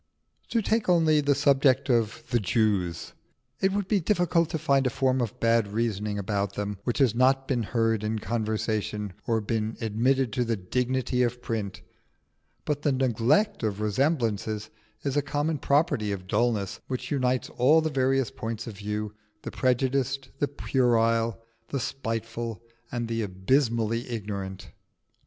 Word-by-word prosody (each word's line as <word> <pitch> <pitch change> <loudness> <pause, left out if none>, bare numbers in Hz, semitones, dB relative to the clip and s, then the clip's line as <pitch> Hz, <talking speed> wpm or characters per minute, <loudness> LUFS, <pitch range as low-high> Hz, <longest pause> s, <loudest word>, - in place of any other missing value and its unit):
To 230 -2 +1
take 220 -1 +1
only 160 -3 +4
the 140 -1 +2
subject 140 -1 +3
of 115 -4 +1
the 120 - +3
Jews: 95 -4 0 0.5
it 190 - +2
would 200 -1 -1
be 205 -1 +2
difficult 175 -2 +2
to - - -1
find 140 -3 +2
a - - +2
form 130 0 +1
of 115 -4 -3
bad 115 -2 +3
reasoning 105 -1 -1
about 100 0 -1
them 105 -1 -4
which 120 - -1
has 130 -6 +4
not 135 +2 +3
been 125 -3 0
heard 115 -1 0
in 110 +1 -1
conversation 110 -2 -2
or 115 -1 +2
been 110 +1 -2
admitted 120 +2 +1
to 125 - +1
the 115 -1 0
dignity 125 +6 -1
of 125 0 0
print; 110 -5 -4 0.8
but 145 -1 -1
the 145 - +2
neglect 130 - +2
of 105 -3 -1
resemblances 110 -3 0 0.3
is 140 -1 -1
a 145 - +3
common 145 +2 -1
property 140 -9 +1
of 95 -2 -4
dulness 105 -1 0
which 130 +3 -4
unites 130 -3 0
all 140 +6 +4
the 160 -1 -1
various 135 -1 +1
points 115 -4 -5
of 110 -4 -8
view 105 +1 -3 0.3
the - - -5
prejudiced, 130 +1 0
the 145 - +2
puerile, 115 -5 +1 0.3
the 140 - -2
spiteful, 115 -3 -4 0.3
and 120 -1 -2
the 115 0 -1
abysmally 115 +3 0
ignorant. 100 -4 -5
120 Hz, 155 wpm, -27 LUFS, 110-135 Hz, 0.8 s, only